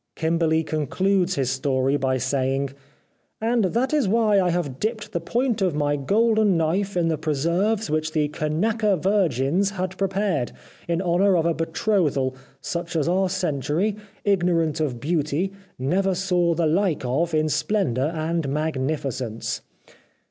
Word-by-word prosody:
Kimberly 160 0 +1
concludes 180 +5 0
his 130 -3 0
story 135 0 +1
by 130 -2 +1
saying: 135 +1 0 0.3
" - - -43 0.3
And 230 -1 +1
that 240 - 0
is 295 -8 +2
why 210 -1 +3
I 180 - +1
have 165 -7 -2
dipped 215 0 -3
the 170 - -2
point 235 +4 0
of 180 -5 +1
my 145 -1 +1
golden 210 +5 +2
knife 180 +5 0
in 170 -1 +2
the 160 -2 0
preserves 170 +9 0
which 155 +1 -1
the 155 -2 +1
Kanaka 195 +8 0
virgins 180 - +1
had 185 -1 -4
prepared, 195 -8 0 0.3
in 170 +2 0
honour 180 +2 +3
of 165 - +1
a 170 - +2
betrothal, 160 - 0 0.3
such 170 0 -4
as 155 -2 +1
our 185 +2 +2
century, 180 - -1 0.3
ignorant 175 -5 +2
of 135 -6 -1
beauty, 155 +5 -1 0.2
never 185 +9 +1
saw 175 -2 +1
the 170 0 +1
like 165 -3 +1
of 160 +7 0
in 155 0 +2
splendour 145 - 0
and 160 -1 -1
magnificence." 135 -5 -2
170 Hz, 150 wpm, -24 LUFS, 145-195 Hz, 0.3 s, why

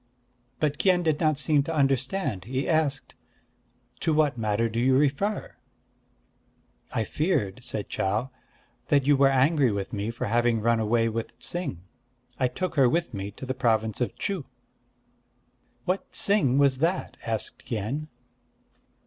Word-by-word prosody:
But 150 -1 0
Kien 180 -2 +3
did 155 -3 +1
not 155 -3 +2
seem 150 0 +3
to 160 +3 -3
understand. 135 - 0
He 130 +3 -2
asked: 155 -4 0 0.9
"To 160 -2 +1
what 150 -3 +3
matter 110 0 0
do 115 +1 -3
you 130 +2 +4
refer?" 150 +9 0 1.3
"I 110 - 0
feared," 125 - -1
said 110 -4 -3
Chau, 110 +7 -1 0.6
"that 140 -2 +3
you 145 0 +5
were 135 0 +5
angry 135 -1 +3
with 100 -1 -4
me 105 +1 -2
for 120 +2 -4
having 120 +1 +2
run 115 +1 +2
away 115 +1 +2
with 115 0 -4
Ts'ing. 155 - -4 0.6
I 130 - +3
took 185 +8 -3
her 130 -3 +6
with 170 +3 -1
me 100 -1 -4
to 105 +6 -9
the 130 - -2
province 110 -3 0
of 125 - -1
Chuh." 190 -8 -3 1.4
"What 185 +2 -2
Ts'ing 150 -11 +3
was 140 -2 +3
that?" 170 +5 0
asked 110 -2 -3
Kien. 120 +7 -3
130 Hz, 150 wpm, -26 LUFS, 115-155 Hz, 1.4 s, her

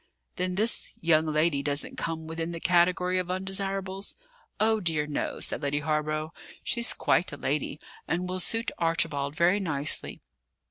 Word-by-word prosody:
"Then 180 0 -1
this 220 +4 0
young 160 -1 +3
lady 155 -1 +2
doesn't 145 0 +2
come 160 -1 -3
within 165 +1 -4
the 165 - -5
category 180 +1 +3
of 180 -1 -3
undesirables?" 195 +1 -1 0.4
"Oh, 220 0 +3
dear, 160 -6 +1
no," 150 -1 -3
said - - +1
Lady 145 0 0
Hawborough. 155 +1 -1 0.3
"She's 235 0 0
quite 180 - +2
a 145 - -6
lady 145 +1 -2 0.3
and 175 +4 -1
will 185 0 -3
suit 225 +5 0
Archibald 155 -4 0
very 175 +5 +3
nicely. 150 -7 0
165 Hz, 150 wpm, -28 LUFS, 155-185 Hz, 0.4 s, young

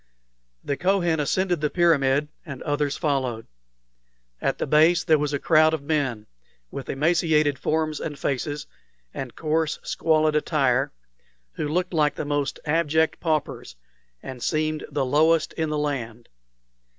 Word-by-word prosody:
The 140 - -2
Kohen 175 -3 +1
ascended 175 +3 0
the 150 - +1
pyramid, 150 -4 +2
and 140 -7 -8
others 145 -1 -1
followed. 130 -6 -1 1.0
At - - 0
the - - -2
base 165 +3 +4
there 155 -3 +3
was 145 0 -1
a 145 - 0
crowd 155 +2 +4
of 145 - -8
men, 140 -8 -1 0.5
with 135 - -7
emaciated 155 -1 +2
forms 155 0 -1
and 150 -3 -5
faces, 145 +2 -3 0.5
and 130 -3 -6
coarse, 155 -1 0
squalid 155 -1 +1
attire, 140 -3 +1 0.6
who - - -3
looked 180 +4 -1
like 150 -3 +2
the - - -4
most 145 -1 -2
abject 160 0 +1
paupers, 155 - -2 0.5
and 130 -2 -8
seemed 155 +1 -1
the 140 -2 -1
lowest 155 +4 +2
in 160 -1 -2
the 150 - -1
land. 120 -6 -4
150 Hz, 140 wpm, -24 LUFS, 140-160 Hz, 1.0 s, base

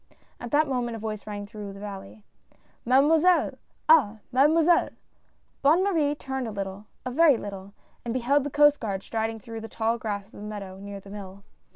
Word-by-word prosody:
At 240 - -6
that 300 +4 +3
moment 245 -3 -2
a - - -6
voice 215 -1 -5
rang 205 -1 -5
through 205 -2 -8
the 195 - -11
valley: 200 0 -9 0.3
" - - -36
Mademoiselle 310 +7 +4
— - - -42
ah 305 -10 +6
I - - -20
Mademoiselle! 315 +6 +4 0.4
" - - -42
Bonne 315 +7 +4
Marie 315 -7 +1
turned 265 -3 -4
a - - -4
little 200 0 -6
— - - -42
a 255 - -3
very 295 -1 +5
little, 200 -1 -8 0.3
and 235 - -3
be 255 +1 -1
held 280 +4 +3
the 290 - -3
Coast 295 +1 +5
Guard 195 -4 -3
striding 225 0 -2
through 225 +1 -8
the 225 - -8
tall 230 +1 -1
grass 205 -1 -5
of - - -11
the 210 - -6
meadow, 195 -3 -7
near 200 0 -7
the 195 0 -13
mill. 200 -1 -9
225 Hz, 215 wpm, -26 LUFS, 205-285 Hz, 0.4 s, ah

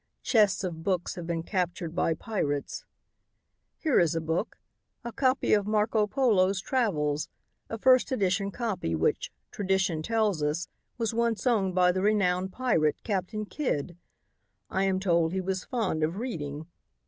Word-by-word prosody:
Chests 205 -5 +3
of 170 -3 -4
books 180 0 -1
have 175 -2 -7
been 165 -1 -2
captured 175 -3 -2
by 165 -2 +1
pirates. 150 -8 -3 0.9
"Here 310 -5 +2
is 170 -1 +2
a - - +1
book, 160 +6 -2 0.5
a 235 - -5
copy 260 +2 +1
of 205 -1 +2
Marco 215 0 +2
Polo's 200 -7 +2
travels, 155 - 0 0.4
a 225 - -4
first 255 +4 +4
edition 200 -4 +1
copy 200 - -2
which, 80 +1 0 0.2
tradition 190 -5 0
tells 215 -3 0
us, 150 +4 -1 0.3
was 230 -2 -1
once 230 0 0
owned 200 -7 +2
by 180 -1 +5
the 185 +1 -2
renowned 190 -3 +1
pirate, 185 -11 +1
Captain 210 +1 -2
Kidd. 175 - -2 0.8
I 190 +1 +1
am 190 -1 +1
told 170 -3 +2
he 190 - 0
was 190 0 -3
fond 215 -10 -1
of 155 +3 0
reading. 155 - -4
190 Hz, 150 wpm, -28 LUFS, 165-220 Hz, 0.9 s, by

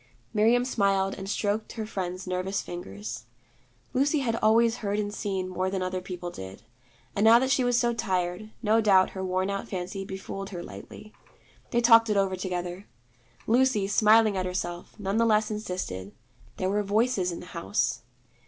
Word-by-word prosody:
Miriam 230 +3 +3
smiled 195 -5 +1
and 195 0 -7
stroked 210 +1 -1
her 220 -2 -4
friend's 185 -3 -4
nervous 185 +1 -2
fingers. 115 - -7 0.7
Lucy 285 +3 +2
had 230 -3 0
always 230 +2 +3
heard 205 -1 -2
and 205 -1 -2
seen 190 -3 -2
more 185 0 -2
than 190 -1 -2
other 185 0 -2
people 180 -1 -6
did, 95 - -9 0.5
and 200 - +1
now 225 +1 +8
that 260 +2 +1
she 260 - +3
was 245 -1 +2
so 240 -1 +2
tired, 190 -2 -2
no 220 +1 +4
doubt 195 -3 +4
her 190 - -5
worn 185 +1 0
out 200 - -4
fancy 190 +1 -4
befooled 195 0 -6
her 175 -3 -6
lightly. 215 0 -11 0.6
They 240 - +1
talked 230 -1 +6
it 210 - +2
over 195 -1 +2
together. 180 0 -4 0.6
Lucy, 240 -4 +3
smiling 215 +1 +5
at 185 -1 -1
herself, 175 +2 -5
none 200 +1 -1
the 230 - +4
less 215 0 +2
insisted: 180 - -4 0.4
there 185 0 0
were 205 +1 +1
Voices 205 -2 +1
in 170 - -6
the - - -10
house. 105 +4 -1
195 Hz, 175 wpm, -27 LUFS, 185-220 Hz, 0.7 s, now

